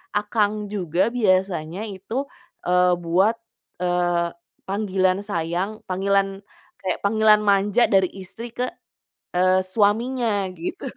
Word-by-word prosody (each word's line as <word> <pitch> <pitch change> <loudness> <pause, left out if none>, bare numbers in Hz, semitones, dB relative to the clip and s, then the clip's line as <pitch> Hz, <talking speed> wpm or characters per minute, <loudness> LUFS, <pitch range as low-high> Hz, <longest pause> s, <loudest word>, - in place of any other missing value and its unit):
"akang" 210 0 0
juga 185 +1 0
biasanya 185 -5 0
itu, 220 +8 -4 0.4
eee, 180 0 +4
buat, 180 +6 +2 0.5
eee, 175 -1 +1 0.4
panggilan 190 -1 0
sayang, 185 +2 -2
panggilan, 195 +1 0 0.4
kayak 185 - -1
panggilan 215 +1 +4
manja 205 +3 +3
dari 190 -3 +3
istri 225 +6 -8
ke, 250 +1 -1 0.7
eee, 185 +1 +4
suaminya 210 +1 +1
gitu. 170 +2 -5
195 Hz, 105 wpm, -23 LUFS, 185-210 Hz, 0.7 s, eee